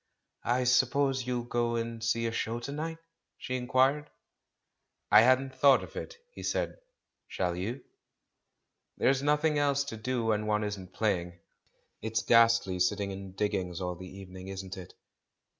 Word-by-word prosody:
"I 125 +2 +2
suppose 130 +1 +2
you'll 125 -1 -1
go 120 0 -1
and 115 0 -3
see 115 0 +1
a 115 - 0
show 115 +1 -2
to 135 - -5
night?" 160 +3 -4 0.4
she 130 - -4
inquired. 130 +4 +2 1.0
"I - - +9
hadn't 130 +2 +3
thought 135 0 +5
of - - -11
it," 480 - -6 0.2
he - - -9
said. - - -2 0.5
"ShaU 90 -1 -1
ymir 100 +9 -4 1.1
"There's 135 0 +2
nothing 150 +1 +2
else 140 -1 +2
to 140 -5 -6
do 120 +1 -2
when 105 -1 0
one 105 0 +1
isn't 95 -3 -5
playing. 90 -5 -1 0.6
It's 110 +2 -1
ghastly 115 -5 +4
sitting 100 +2 +1
in 95 -1 -8
diggings 95 -4 -2
all 90 -1 -2
the 90 +1 -10
evening, 95 -1 -10
isn't 95 0 -6
it?" 90 -2 -10
115 Hz, 155 wpm, -30 LUFS, 95-130 Hz, 1.1 s, I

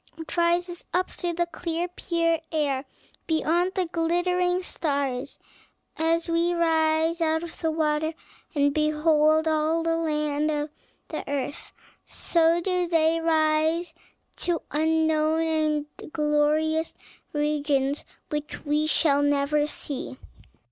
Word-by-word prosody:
It 325 -1 -7
rises 345 +1 +1
up 370 +1 +1
through 350 -1 -3
the 345 +1 +1
clear, 340 0 -3
pure 335 -2 0
air 285 -4 0 0.4
beyond 335 +3 +1
the 375 -2 +1
glittering 355 +2 0
stars. 280 -5 -2 0.6
As 330 +1 +1
we 340 +1 +1
rise 325 0 +2
out 320 0 +1
of 340 - -9
the 325 - 0
water, 315 0 0 0.4
and 285 -1 +3
behold 310 +1 +3
all 315 +1 +1
the 330 0 +1
land 300 -2 0
of 295 0 -2 0.4
the - - -4
earth, 285 0 -4 0.3
so 335 0 +2
do 360 -1 0
they 330 -1 +2
rise 320 +1 +1 0.4
to 345 -2 -1
unknown 315 0 +2
and 310 -2 +1 0.3
glorious 305 +1 +1 0.4
regions 290 -2 0 0.3
which 300 +1 -5
we 300 +1 +1
shall 285 -2 +3
never 290 +1 +2
see." 280 -3 -5
315 Hz, 120 wpm, -26 LUFS, 300-335 Hz, 0.6 s, and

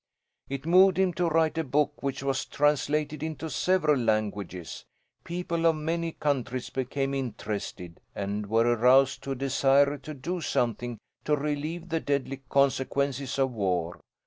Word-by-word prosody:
"It 140 +1 -5
moved 185 +2 +6
him 190 -2 +2
to 170 +1 0
write 160 0 +2
a - - +1
book 145 +1 0
which 135 -1 -3
was 135 -1 -1
translated 150 0 0
into 160 0 -4
several 155 -3 +2
languages. 105 -6 -2 0.4
People 170 -1 -1
of 165 - +4
many 165 +2 -2
countries 130 -4 -2
became 135 +1 -2
interested 105 -8 -5 0.2
and 100 +1 -3
were 115 +2 +3
aroused 125 +3 +4
to 135 - -2
a - - -5
desire 140 +2 +3
to 155 +3 -8
do 175 +6 -4
something 120 -3 -1 0.3
to 150 - +3
relieve 150 +4 -3
the 165 0 0
deadly 135 -2 -2
consequences 140 0 +1
of 135 -1 +2
war. 90 -6 -1
140 Hz, 145 wpm, -28 LUFS, 125-155 Hz, 0.4 s, moved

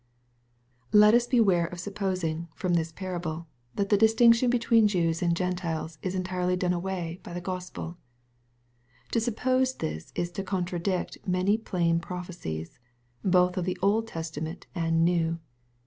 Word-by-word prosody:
Let 210 +1 +7
us 240 0 +4
beware 195 -9 +3
of 175 +1 -8
supposing, 185 -4 -2
from 180 -1 -1
this 165 -1 +1
parable, 170 -2 -4 0.3
that 200 -1 -1
the 205 - +5
distinction 230 +2 +5
between 230 -2 +4
Jews 170 -4 0
and 170 -1 +2
Gentiles 170 -3 -2
is 185 0 -3
entirely 180 -1 0
done 180 0 0
away 175 -1 -3
by - - -9
the 175 - -3
Gospel. 180 -1 -6 1.1
To 230 - +2
suppose 255 +3 +1
this 80 +1 -5
is 175 0 -2
to 195 - -4
contradict 185 -1 -2
many 185 +3 +2
plain 170 -6 0
prophecies, 170 - -6 0.4
both 180 -1 +3
of 180 - 0
the 185 - -2
Old 220 +3 +2
Testament 160 -2 -5
and 165 -2 +2
New. 165 -1 +1
180 Hz, 145 wpm, -28 LUFS, 170-200 Hz, 1.1 s, Let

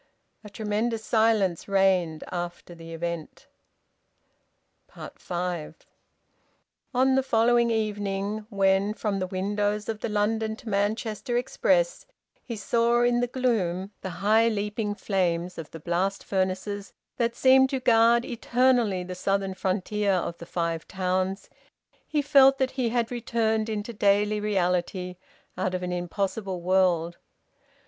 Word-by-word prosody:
A 210 - -10
tremendous 220 +2 -2
silence 220 -6 +2
reigned 190 -5 +2
after 175 0 -5
the 165 -1 -11
event. 170 -1 -5 1.7
FIVE. 175 -3 -4 1.2
On 260 +1 +3
the 265 - +4
following 235 -1 +3
evening, 210 -1 -2
when 195 0 +2
from 205 -2 -2
the 185 - -2
windows 205 +2 -1
of 220 -2 -3
the - - -3
London 220 +1 0
to 225 - -15
Manchester 220 +4 -1
express - - +1 0.4
he 235 - -5
saw 235 +3 +2
in 240 0 +3
the 245 - +1
gloom 205 -7 -1
the 190 - -4 0.2
high 220 +2 +5
leaping 210 -1 -2
flames 180 -4 -1
of 160 - -7
the 165 - -9
blast 180 +5 -1
furnaces 195 +1 -2 0.2
that 235 -1 0
seem 265 0 +5
to 265 0 -2
guard 235 -1 +4
eternally 240 -5 +1
the 180 0 -6
southern 195 +1 -1
frontier 195 +2 0
of 175 -2 -1
the 170 - -9
Five 165 -2 -2
Towns, 185 +1 -1 0.6
he 300 -2 0
felt 270 -2 +6
that 265 -1 0
he 255 -3 -1
had 235 0 -1
returned 225 -2 0
into 215 +2 -4
daily 205 0 +2
reality 180 -2 -1 0.4
out 185 0 -1
of 180 - -3
an 180 - -3
impossible 190 +2 -3
world. 175 -2 +1
205 Hz, 130 wpm, -26 LUFS, 185-230 Hz, 1.7 s, felt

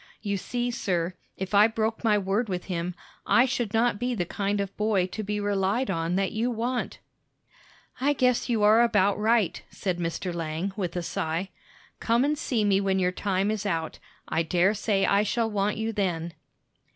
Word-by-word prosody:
"You 200 -2 -1
see, 245 +5 -2
sir, 180 -6 -1 0.2
if 190 +1 -5
I 205 +2 +7
broke 225 0 -2
my 215 -2 +4
word 200 +3 0
with 180 -1 -2
him, 175 -1 -3 0.3
I 245 - +5
should 240 -4 -2
not 225 -1 +2
be 245 +1 -1
the 180 -5 -1
kind 200 +3 -1
of 200 -1 -3
boy 210 -4 +1
to 185 +4 -5
be 210 0 -2
relied 205 +3 0
on 165 0 -1
that 195 0 0
you 225 +3 0
want." 240 +2 -2 1.0
"I 285 +3 +2
guess 250 -2 +1
you 225 -3 +1
are 215 +2 +6
about 205 -4 +3
right," 220 -3 +2
said 180 -3 -3
Mr. 170 +1 -3
Lang, 165 +3 -3
with 185 -4 -3
a 175 - -2
sigh. 165 +3 -2 0.5
"Come 235 +3 +2
and 300 +1 +1
see 245 -8 -1
me 200 -1 +3
when 195 -1 +1
your 180 -1 +2
time 195 +2 0
is 215 -1 -2
out; 165 -5 -2 0.3
I 160 - 0
dare 175 +4 +2
say 200 -2 +1
I 200 +1 +3
shall 225 +2 0
want 205 0 0
you 220 +1 -2
then." 175 -5 -2
205 Hz, 190 wpm, -26 LUFS, 185-225 Hz, 1.0 s, I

